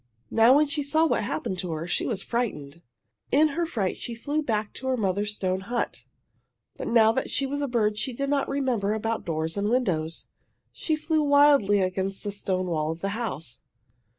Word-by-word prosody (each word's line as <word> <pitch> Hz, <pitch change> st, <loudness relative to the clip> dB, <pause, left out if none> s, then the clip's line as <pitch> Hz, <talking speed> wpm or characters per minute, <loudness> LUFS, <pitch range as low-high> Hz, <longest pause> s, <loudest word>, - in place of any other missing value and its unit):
Now 230 Hz, +4 st, +6 dB
when 300 Hz, +1 st, +5 dB
she 295 Hz, +1 st, -2 dB
saw 310 Hz, +3 st, +3 dB
what -, -, +1 dB
had 205 Hz, -, -3 dB
happened 180 Hz, +4 st, -3 dB
to 180 Hz, -1 st, -3 dB
her 160 Hz, +1 st, -4 dB
she 175 Hz, -, -1 dB
was 205 Hz, -6 st, -2 dB
frightened. 170 Hz, -11 st, -3 dB, 0.5 s
In 305 Hz, +3 st, +5 dB
her 335 Hz, +3 st, -1 dB
fright 210 Hz, -, -2 dB
she 235 Hz, -, -5 dB
flew 290 Hz, +6 st, -2 dB
back 215 Hz, -6 st, -2 dB
to 260 Hz, -, -6 dB
her 260 Hz, -1 st, +1 dB
mother's 205 Hz, 0 st, 0 dB
stone 185 Hz, -2 st, -1 dB
hut. 240 Hz, +5 st, -3 dB, 0.7 s
But -, -, -5 dB
now 225 Hz, -2 st, +5 dB
that 260 Hz, -, -2 dB
she 275 Hz, -, 0 dB
was 285 Hz, +2 st, -3 dB
a 285 Hz, -, 0 dB
bird 215 Hz, -4 st, +1 dB
she 235 Hz, +4 st, -1 dB
did 275 Hz, +3 st, -3 dB
not 280 Hz, -1 st, +1 dB
remember 250 Hz, -7 st, 0 dB
about 225 Hz, +1 st, -1 dB
the -, -, -18 dB
doors 160 Hz, +1 st, -2 dB
and 205 Hz, +1 st, 0 dB
windows. 175 Hz, -10 st, -1 dB, 0.4 s
She 315 Hz, -, -1 dB
flew 310 Hz, 0 st, 0 dB
wildly 285 Hz, -9 st, +5 dB
against 190 Hz, +1 st, -2 dB
the 205 Hz, -, -3 dB
stone 190 Hz, -2 st, -2 dB
wall 155 Hz, -3 st, -1 dB
of 165 Hz, +1 st, -4 dB
the 195 Hz, -, -1 dB
house. 165 Hz, -, -4 dB
220 Hz, 205 wpm, -26 LUFS, 185-275 Hz, 0.7 s, Now